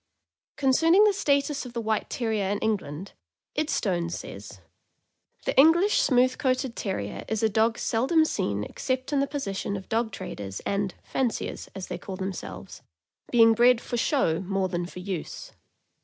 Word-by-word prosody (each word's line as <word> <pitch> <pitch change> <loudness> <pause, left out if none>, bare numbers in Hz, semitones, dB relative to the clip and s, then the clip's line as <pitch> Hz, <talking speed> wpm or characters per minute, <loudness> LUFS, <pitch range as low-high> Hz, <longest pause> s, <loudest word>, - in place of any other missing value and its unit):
Concerning 325 +8 +4
the 420 -1 +5
status 280 -5 +1
of 250 -2 -9
the 235 - -2
White 220 -1 -1
Terrier 220 -5 -1
in 205 - 0
England, 195 -5 -3 0.2
" - - -61
Idstone" 195 - 0
says: 100 - -8 0.9
The - - -1
English 340 +8 +6
smooth 255 -1 +3
coated 255 -2 0
Terrier 105 - -4
is 220 0 -2
a 220 - +4
dog 225 +2 +2
seldom 270 +8 +2
seen 105 - -1
except 260 - -3
in 285 - +3
the 275 - +1
pos 285 -1 -4
session 200 0 -3
of 190 - -10
dog 225 0 0
traders 95 -1 -6
and 200 -1 -2
"fanciers," 255 -4 -2
as 190 -1 -5
they - - -6
call 190 - -6
themselves, 190 -1 -6 0.5
being 225 -2 +6
bred 240 +1 +5
for 240 - -5
show 235 - +1
more 195 0 -1
than 175 -1 -2
for 180 - -12
use. 185 -3 -5
225 Hz, 165 wpm, -26 LUFS, 190-265 Hz, 0.9 s, English